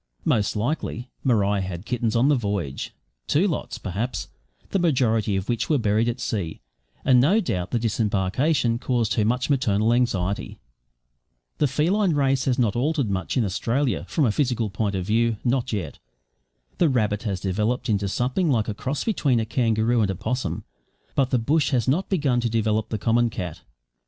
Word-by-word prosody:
Most 105 0 +1
likely 120 +1 -2
Maria 105 -5 +2
had 95 0 -5
kittens 115 -2 -1
on 120 +4 +4
the 150 - +5
voyage 100 - -3 0.4
two 175 +8 +3
lots, 170 - -3
perhaps 105 +6 -4 0.4
the 195 - +1
majority 115 - +2
of 95 0 -2
which 120 -2 -1
were 155 - +3
buried 110 0 +1
at 120 +2 -3
sea; 100 -10 -3 0.5
and 125 -2 +6
no 185 - +4
doubt 90 - -2
the 120 - 0
disembarkation 115 - +1
caused 120 -4 0
her 110 - +1
much 125 +4 +1
maternal 115 -5 +2
anxiety. 100 -6 -1 1.0
The 150 - +3
feline 170 +6 +1
race 135 -2 +2
has 130 -2 +1
not 115 -6 +1
altered 135 -2 0
much 95 +6 -2
in 120 - +3
Australia, 120 +7 -1
from 155 - +2
a 115 - +3
physical 120 -4 0
point 100 -1 -1
of 95 -2 -2
view 115 +2 +1
not 125 0 0
yet. 95 -9 -4 0.8
The 170 - +4
rabbit 105 -5 +1
has 100 -5 -2
developed 105 +7 -1
into 100 -3 +1
something 125 - 0
like 115 -6 +1
a 110 - -2
cross 135 +7 -3
between 140 - +1
a 110 - -1
kangaroo 115 0 +1
and 100 - +1
a 95 - -1
possum, 105 -3 -3 0.5
but 135 -2 +1
the 130 - +2
bush 145 +6 +1
has 125 -5 0
not 165 +9 +1
begun 145 -10 +1
to 120 -1 0
develop 110 -1 0
the 110 - -2
common 115 +3 +2
cat. 90 -5 -6
115 Hz, 180 wpm, -24 LUFS, 105-130 Hz, 1.0 s, and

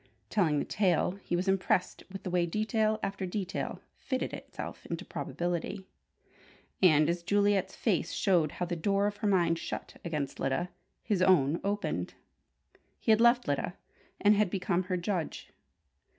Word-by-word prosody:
Telling 165 -8 +2
the - - 0
tale, 180 -5 +2
he 175 - -1
was 180 +3 -1
impressed 190 -1 +1
with 195 - -7
the 185 - -4
way 175 -1 +2
detail 215 +3 +1
after 195 -1 -2
detail 190 0 -4
fitted 260 -2 -3
itself - - -7
into - - -4
probability; 175 +3 -3 1.0
and 155 -5 +6
as 170 +1 0
Juliet's 200 +1 +2
face 180 -6 0
showed 170 -7 +2
how 180 - -2
the 175 0 -3
door 195 +4 +1
of 205 0 -1
her 210 - -1
mind 170 -4 +3
shut - - -6
against 150 -5 -3
Lyda, 175 +7 -1 0.3
his 205 -5 0
own 170 -5 +4
opened. 205 +1 -2 0.8
He 225 - +1
had 220 +1 +5
left 240 -1 +5
Lyda, 145 +5 -1 0.4
and 205 +1 +5
had 205 -2 +2
become 185 -1 0
her 180 0 -1
judge. 175 -2 -3
185 Hz, 155 wpm, -30 LUFS, 170-205 Hz, 1.0 s, and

